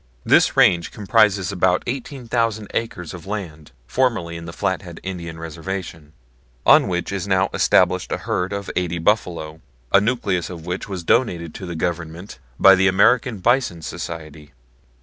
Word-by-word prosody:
This - - +4
range 85 -1 +4
comprises 105 -3 +2
about 90 -1 +1
18,000 115 -4 -2
acres 90 -8 -3
of 90 +1 -10
land 85 -7 -6
formerly 110 - 0
in 85 0 -7
the 85 - -7
Flathead - - -3
Indian 85 -3 -6
Reservation, 80 -1 -6 0.5
on - - +6
which 90 0 -2
is 100 0 -3
now 95 -1 +2
established 90 0 +2
a - - 0
herd 90 +2 -2
of 100 -1 -4
eighty 90 -2 -1
buffalo, 85 -4 -1 0.3
a 100 - +6
nucleus 100 -7 -1
of 85 -3 -9
which 90 +3 -4
was 95 -3 -5
donated 85 -7 +1
to 95 - -8
the 85 - -5
Government 85 +2 -4 0.2
by 95 - +8
the 95 +1 +4
American 115 +4 +3
Bison 120 -8 +1
Society. 80 -3 -7
90 Hz, 150 wpm, -21 LUFS, 85-100 Hz, 0.5 s, by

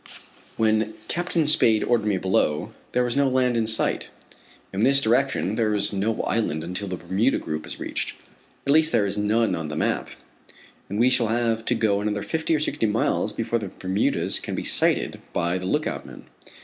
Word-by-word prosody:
When 110 -1 +1
Captain 170 -1 0
Spade 115 -7 +4
ordered 115 -3 +1
me 100 -2 +1
below, 90 -5 0 0.2
there 125 - +2
was 120 -1 -1
no 140 -1 +3
land 130 -1 +2
in 115 -1 +1
sight. 110 0 +1 0.6
In 95 - -3
this 135 +5 +4
direction, 120 - +1
there 110 -2 +1
is 105 - +1
no 105 +3 -1
island 80 -9 -1
until 90 +4 -4
the 90 -1 -4
Bermuda 95 +10 +1
group 75 0 -5
is - - -7
reached - - -4 0.5
at 140 - +3
least 160 +1 +4
there 105 - +3
is 100 +1 -2
none 110 +2 +2
on 80 -2 -3
the 75 - -5
map - - -1 0.8
and 100 +2 -3
we 125 +2 +4
shall 120 -3 +4
have 115 0 0
to 120 - +2
go 100 -3 +1
another 105 -1 -2
fifty 160 0 0
or - - +1
sixty 145 -5 0
miles 105 +2 0
before 115 0 -1
the 105 - -5
Bermudas 95 +2 0
can - - -5
be - - -3
sighted - - 0
by 85 +2 0
the 90 - -5
lookout - - -1
men. - - -12
110 Hz, 195 wpm, -24 LUFS, 100-125 Hz, 0.8 s, Spade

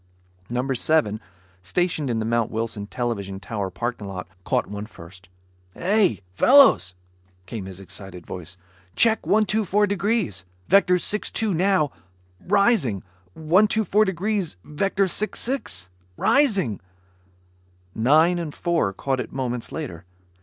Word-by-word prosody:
Number 125 +3 -1
Seven, 115 -6 +1 0.4
stationed 160 - -1
in 115 - 0
the 110 - -1
Mount 115 0 +1
Wilson 110 -2 -4
television 100 -5 -3
tower 100 -1 -4
parking 120 -1 -4
lot, 90 -2 -6 0.2
caught - - 0
one 105 +1 -6
first. 90 -1 -14 0.5
"Hey 195 - +2
fellows," 245 - +6 0.5
came 100 0 -6
his 95 -1 -8
excited 95 -1 -10
voice, 90 0 -8 0.4
"check 225 -1 +3
124 210 -1 +2
degrees, 200 - -1 0.2
vector 190 -2 +5
62 210 +2 0
now... 180 -4 +2 0.6
rising... 200 - +2 0.3
124 210 +5 +3
degrees... 190 - -2
vector 195 +5 0
66... 210 - -1 0.3
rising 200 - +2 0.6
" 90 0 -36
Nine 155 +9 +4
and 160 -4 -5
Four 170 - 0
caught 135 +6 -2
it 120 - -5
moments 125 -3 -3
later. 95 - -6
135 Hz, 120 wpm, -23 LUFS, -, 0.6 s, fellows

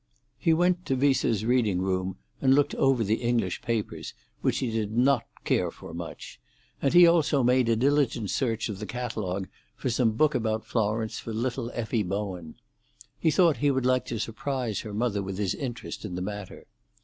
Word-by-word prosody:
He 165 - +2
went 175 +2 +2
to 135 - +1
Viesseux's 125 -5 +2
reading 115 -6 +2
room 95 0 -1 0.2
and 135 -1 +5
looked 145 0 +2
over 135 -3 +2
the 110 +2 0
English 115 -7 0
papers, 115 -3 -3 0.3
which - - +1
he 125 -3 -1
did 110 0 -2
not 130 -1 +3 0.2
care - - +1
for - - -11
much; 85 0 -8 0.4
and 140 - +2
he 175 0 +10
also 155 -5 +3
made 125 0 +3
a 115 - +4
diligent 125 -4 +1
search 115 -4 0
of 105 -4 -5
the 105 - -5
catalogue 105 -6 -3 0.3
for 130 - -2
some 115 -1 +2
book 150 +7 +3
about 110 -1 -1
Florence 110 0 -1
for 115 - -6
little 120 +1 -2
Effie 115 -1 -1
Bowen: 95 -4 -4 0.6
he 160 - +3
thought 165 -3 +4
he 145 +5 +2
would 130 -2 0
like 130 -1 +2
to 120 - -3
surprise 115 -1 -2
her 110 - -6
mother 110 -2 0
with 95 -1 -5
his 100 -2 0
interest 125 -4 -6
in 95 -5 -5
the 90 - -3
matter. 105 -1 -7
115 Hz, 185 wpm, -27 LUFS, 105-130 Hz, 0.6 s, he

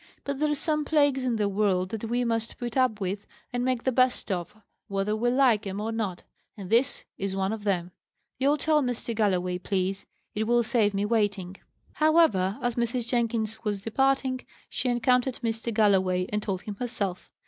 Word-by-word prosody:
"But 280 -1 -3
there's 300 -1 +1
some 305 0 +1
plagues 285 -3 +2
in 250 -2 0
the 210 -2 +1
world 195 -2 +1
that 225 +1 -4
we 240 +2 0
must 230 -1 -2
put 240 -2 -5
up 255 -5 +2
with, 195 +1 -3 0.3
and 245 0 0
make 255 -2 0
the 260 - +2
best 255 -3 +1
of, 175 0 -3 0.3
whether 195 +2 -1
we 240 +3 +1
like 245 -5 +3
'em 195 +1 -4
or 220 +2 -2
not; 210 -6 -3 0.3
and 195 -2 -8
this 245 +4 +2
is 195 -1 -2
one 195 +2 0
of 215 -2 -7
them. 180 -3 0 0.5
You'll 280 +3 +3
tell 305 +1 +2
Mr. 245 -2 -2
Galloway, 180 -5 0
please; 190 +1 -2 0.3
it 215 +1 -1
will 240 +1 +3
save 220 -3 +1
me 200 +1 0
waiting." 205 -4 0 0.4
However, 305 - +3
as 245 0 +1
Mrs. 235 0 -1
Jenkins 230 -2 -1
was 205 -3 -2
departing, 260 +2 +1 0.3
she 255 - -1
encountered 250 +1 +2
Mr. 225 0 -1
Galloway, 190 -4 +3
and 210 0 -1
told 190 -3 -3
him 205 -2 -6
herself. 205 -7 -3
225 Hz, 185 wpm, -27 LUFS, 195-250 Hz, 0.5 s, like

